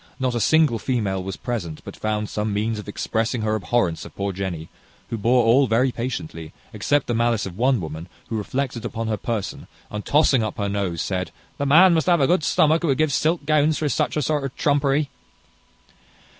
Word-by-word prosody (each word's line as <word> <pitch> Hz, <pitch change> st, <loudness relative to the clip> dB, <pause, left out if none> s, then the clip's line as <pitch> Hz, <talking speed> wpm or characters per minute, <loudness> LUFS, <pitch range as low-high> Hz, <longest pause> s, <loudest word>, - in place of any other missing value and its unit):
Not 130 Hz, -1 st, 0 dB
a 120 Hz, -, -1 dB
single 150 Hz, -1 st, +3 dB
female 105 Hz, -7 st, -1 dB
was 95 Hz, 0 st, -5 dB
present 100 Hz, -11 st, -4 dB
but -, -, -8 dB
found 105 Hz, 0 st, -2 dB
some 105 Hz, +1 st, -2 dB
means 105 Hz, +2 st, -1 dB
of 105 Hz, -, -9 dB
expressing 110 Hz, +2 st, -2 dB
her 110 Hz, 0 st, 0 dB
abhorrence 105 Hz, -5 st, 0 dB
of -, -, -12 dB
poor 100 Hz, 0 st, -2 dB
Jenny, 90 Hz, -4 st, -4 dB, 0.4 s
who -, -, -1 dB
bore 120 Hz, +4 st, +3 dB
all 130 Hz, +4 st, +5 dB
very 125 Hz, +3 st, +2 dB
patiently, 85 Hz, -10 st, -5 dB, 0.2 s
except 135 Hz, +7 st, +1 dB
the 120 Hz, -, -2 dB
malice 115 Hz, -1 st, +1 dB
of 95 Hz, -3 st, -7 dB
one 125 Hz, +3 st, +2 dB
woman, 80 Hz, +1 st, -7 dB, 0.2 s
who 115 Hz, -, -3 dB
reflected 120 Hz, +2 st, -3 dB
upon 115 Hz, -1 st, -3 dB
her 110 Hz, -, +1 dB
person, 110 Hz, -1 st, -4 dB, 0.2 s
and 105 Hz, 0 st, -4 dB
tossing 145 Hz, -4 st, +3 dB
up 110 Hz, -1 st, -3 dB
her 100 Hz, -1 st, -1 dB
nose, 100 Hz, -5 st, -2 dB
said, 95 Hz, -1 st, -2 dB, 0.3 s
"The 140 Hz, -, 0 dB
man 170 Hz, +6 st, +7 dB
must 160 Hz, 0 st, +1 dB
have 175 Hz, -2 st, +4 dB
a 135 Hz, -, +4 dB
good 175 Hz, +2 st, +2 dB
stomach 155 Hz, +2 st, +3 dB
who 170 Hz, -, -1 dB
would 135 Hz, -3 st, +2 dB
give 155 Hz, -2 st, +1 dB
silk 160 Hz, +2 st, +1 dB
gowns 155 Hz, 0 st, +3 dB
for 150 Hz, -, -1 dB
such -, -, 0 dB
sort 150 Hz, -1 st, 0 dB
of 135 Hz, -2 st, -5 dB
trumpery!" 145 Hz, 0 st, +1 dB
115 Hz, 205 wpm, -23 LUFS, 100-140 Hz, 0.4 s, man